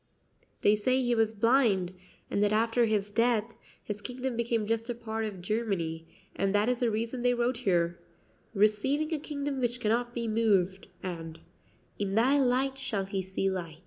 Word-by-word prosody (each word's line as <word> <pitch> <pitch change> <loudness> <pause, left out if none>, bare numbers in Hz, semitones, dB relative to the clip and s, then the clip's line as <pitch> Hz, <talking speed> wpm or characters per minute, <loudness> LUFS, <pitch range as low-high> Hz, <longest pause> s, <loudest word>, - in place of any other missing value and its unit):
"They 205 - +6
say 255 +5 +2
he 245 -2 +1
was 225 -1 +1
blind, 215 -5 +3 0.4
and 200 - +1
that 205 0 +3
after 230 +2 +3
his 210 -2 0
death 230 0 +1 0.3
his 210 -1 -5
kingdom 250 +2 -3
became 230 -2 0
just 230 +2 -1
a 240 - -1
part 225 -1 -3
of 195 -4 -6
Germany, 180 -7 -2 0.3
and 195 +1 0
that 205 +2 +3
is 250 -1 0
the 240 - +2
reason 230 +3 -2
they 245 0 +3
wrote 240 +1 0
here, 175 -7 +1 0.6
'Receiving 240 +10 +2
a 310 - -1
kingdom 285 -2 -3
which 240 0 0
cannot 240 +2 0
be 235 -1 -2
moved,' 200 -4 +1 0.2
and, 165 -3 -6 0.6
'In 200 -1 -1
thy 260 +6 +4
light 265 +1 +1
shall 205 -7 -2
he 195 0 -2
see 190 +1 -2
light.'" 175 -5 -3
225 Hz, 175 wpm, -29 LUFS, 195-245 Hz, 0.6 s, They